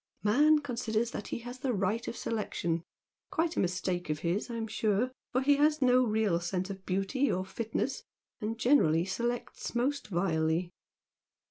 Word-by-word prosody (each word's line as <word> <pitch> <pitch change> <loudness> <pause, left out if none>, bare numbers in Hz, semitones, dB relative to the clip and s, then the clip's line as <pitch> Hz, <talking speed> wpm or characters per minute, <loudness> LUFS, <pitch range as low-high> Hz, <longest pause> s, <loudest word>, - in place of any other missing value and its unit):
Man 295 +9 +5
considers 235 -4 -1
that 205 - -5
he - - -3
has 245 +1 -7
the 255 -1 0
right 200 +4 0
of 230 - -4
selection 170 -7 -2 0.5
quite 330 +1 0
a - - 0
mistake 180 -1 -1
of 150 -1 -1
his 180 +8 -1
I'm 230 -1 -3
sure, 220 +2 0 0.2
for 255 - +2
he 285 +1 +4
has 300 +1 +3
no 255 -1 +5
real 215 -6 +2
sense 180 +2 -2
of 190 -1 -9
beauty 195 +9 +1
or 185 +1 -1
fitness, 220 +4 -2 0.4
and 220 +2 -3
generally 175 - +4
selects 240 +5 -3
most 275 +4 0
vilely. 170 -2 0
220 Hz, 160 wpm, -31 LUFS, 185-250 Hz, 0.5 s, Man